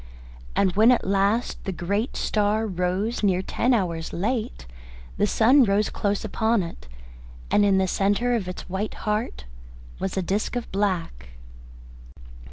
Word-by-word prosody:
And 190 Hz, -2 st, +2 dB
when 220 Hz, +3 st, +6 dB
at 245 Hz, -, +1 dB
last 200 Hz, +4 st, 0 dB
the 195 Hz, -, -2 dB
great 200 Hz, +7 st, -2 dB
star 215 Hz, +1 st, +1 dB
rose 190 Hz, +4 st, -1 dB
near 190 Hz, -3 st, +2 dB
ten 245 Hz, +6 st, 0 dB
hours 170 Hz, -8 st, 0 dB
late, 220 Hz, -, -2 dB, 0.5 s
the 205 Hz, -, +2 dB
sun 255 Hz, +7 st, +5 dB
rose 205 Hz, -1 st, +1 dB
close 205 Hz, +1 st, -1 dB
upon 220 Hz, 0 st, +1 dB
it, 165 Hz, -, -9 dB, 0.6 s
and 205 Hz, -, +4 dB
in 200 Hz, -1 st, +4 dB
the 190 Hz, 0 st, +2 dB
centre 205 Hz, +6 st, +1 dB
of 215 Hz, -6 st, -1 dB
its 180 Hz, -, -7 dB
white 190 Hz, +4 st, -3 dB
heart 210 Hz, -, -2 dB, 0.5 s
was 190 Hz, 0 st, -3 dB
a 190 Hz, -, 0 dB
disc 200 Hz, +7 st, -2 dB
of 240 Hz, -1 st, -4 dB
black. 170 Hz, -, -2 dB
200 Hz, 150 wpm, -24 LUFS, 185-220 Hz, 0.6 s, when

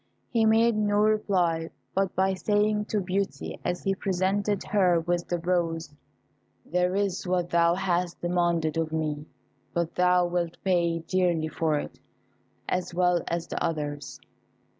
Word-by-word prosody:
He 230 Hz, -2 st, +3 dB
made 225 Hz, +1 st, +4 dB
no 210 Hz, -1 st, +1 dB
reply 190 Hz, -6 st, +2 dB, 0.2 s
but 195 Hz, -1 st, 0 dB
by 190 Hz, +1 st, +2 dB
saying 210 Hz, +2 st, +1 dB
to 215 Hz, -, -1 dB
Beauty, 195 Hz, +1 st, -3 dB
as 175 Hz, -, -2 dB
he 195 Hz, -, +1 dB
presented 195 Hz, +2 st, 0 dB
her 185 Hz, -4 st, +3 dB
with 175 Hz, +1 st, -1 dB
the 175 Hz, -, -1 dB
rose, 165 Hz, -3 st, -1 dB, 0.7 s
"There 180 Hz, +2 st, 0 dB
is 195 Hz, -2 st, -1 dB
what 180 Hz, -1 st, 0 dB
thou 170 Hz, 0 st, +4 dB
hast 180 Hz, -2 st, -1 dB
demanded 170 Hz, -2 st, 0 dB
of 160 Hz, -1 st, -1 dB
me, 155 Hz, -1 st, -2 dB, 0.5 s
but 170 Hz, -1 st, -1 dB
thou 180 Hz, 0 st, +3 dB
wilt 175 Hz, -1 st, -2 dB
pay 170 Hz, -3 st, +1 dB
dearly 175 Hz, -4 st, +1 dB
for 155 Hz, -1 st, 0 dB
it, -, -, -6 dB, 0.7 s
as 180 Hz, -1 st, -2 dB
well 180 Hz, -1 st, +3 dB
as 170 Hz, 0 st, -2 dB
the -, -, -4 dB
others." 145 Hz, -4 st, -3 dB
180 Hz, 145 wpm, -27 LUFS, 165-195 Hz, 0.7 s, made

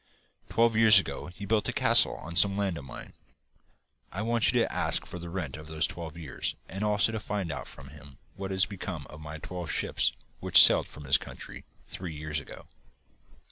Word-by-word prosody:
Twelve 115 Hz, -1 st, +2 dB
years 110 Hz, -2 st, +7 dB
ago 95 Hz, -, -1 dB
he 90 Hz, +3 st, -9 dB
built 110 Hz, +1 st, +1 dB
a -, -, 0 dB
castle -, -, +4 dB
on 85 Hz, +1 st, -9 dB
some 100 Hz, +3 st, +5 dB
land 100 Hz, -3 st, -1 dB
of 70 Hz, -, -11 dB
mine. 65 Hz, -, -10 dB, 1.0 s
I 100 Hz, +4 st, -4 dB
want 115 Hz, 0 st, +3 dB
you -, -, +2 dB
to -, -, 0 dB
ask -, -, 0 dB
for 90 Hz, -, -8 dB
the 85 Hz, 0 st, -7 dB
rent 85 Hz, -6 st, -4 dB
for -, -, -9 dB
those 80 Hz, +1 st, -1 dB
twelve 85 Hz, -2 st, -7 dB
years 75 Hz, -6 st, -4 dB
and 95 Hz, +4 st, -5 dB
also 105 Hz, +1 st, +2 dB
to 110 Hz, -, -3 dB
find 100 Hz, -5 st, -3 dB
out 75 Hz, -, -6 dB
from 65 Hz, -1 st, -12 dB
him 70 Hz, -1 st, -14 dB, 0.2 s
what 95 Hz, 0 st, -5 dB
has 95 Hz, +1 st, +2 dB
become 90 Hz, -7 st, -6 dB
of 75 Hz, -, -11 dB
my 75 Hz, +1 st, -7 dB
twelve 90 Hz, +1 st, -7 dB
ships -, -, +1 dB, 0.3 s
which -, -, +6 dB
sailed -, -, +7 dB
for 75 Hz, -, -12 dB
his 65 Hz, -, +4 dB
country -, -, -9 dB, 0.2 s
three 90 Hz, -4 st, -6 dB
years 75 Hz, +1 st, -3 dB
ago. 75 Hz, -, -11 dB
90 Hz, 205 wpm, -28 LUFS, 75-100 Hz, 1.0 s, years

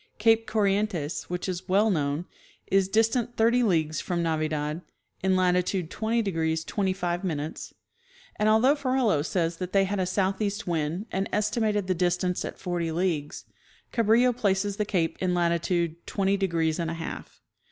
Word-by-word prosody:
Cape 225 Hz, +1 st, +3 dB
Corrientes, 200 Hz, -7 st, 0 dB
which 180 Hz, +1 st, -3 dB
was 185 Hz, 0 st, -5 dB
well 205 Hz, +4 st, +4 dB
known, 150 Hz, -1 st, -1 dB, 0.4 s
is 195 Hz, -1 st, +2 dB
distant 225 Hz, +3 st, +1 dB
thirty 235 Hz, +2 st, +4 dB
leagues 160 Hz, -8 st, +1 dB
from 175 Hz, -2 st, -2 dB
Navidad, 155 Hz, -1 st, -1 dB, 0.4 s
in 190 Hz, 0 st, +2 dB
lati 180 Hz, -1 st, +3 dB
tude 180 Hz, -3 st, -3 dB
20° 185 Hz, -8 st, -1 dB
25', 185 Hz, -3 st, -1 dB
and 195 Hz, -, -5 dB
although 225 Hz, +6 st, +5 dB
Ferrelo 255 Hz, -, +1 dB
says 165 Hz, 0 st, -1 dB
they 185 Hz, +2 st, +1 dB
had 195 Hz, +1 st, -2 dB
a 185 Hz, -, 0 dB
southeast 200 Hz, +3 st, -1 dB
wind, 165 Hz, +3 st, -2 dB
and 195 Hz, +1 st, -1 dB
estimated 210 Hz, -1 st, 0 dB
the 185 Hz, -, +1 dB
distance 180 Hz, +1 st, 0 dB
at -, -, -6 dB
forty 175 Hz, -3 st, -2 dB
leagues, 160 Hz, -4 st, -2 dB, 0.5 s
Cabrillo 235 Hz, +2 st, +3 dB
places 200 Hz, -3 st, 0 dB
the 210 Hz, -, 0 dB
cape 170 Hz, -5 st, -1 dB
in 180 Hz, -1 st, +1 dB
latitude 170 Hz, -1 st, 0 dB
"twenty 195 Hz, -1 st, +1 dB
degrees 170 Hz, -4 st, 0 dB
and 165 Hz, -1 st, -1 dB
a 165 Hz, -, -3 dB
half." 165 Hz, 0 st, -7 dB
185 Hz, 150 wpm, -27 LUFS, 170-210 Hz, 0.5 s, although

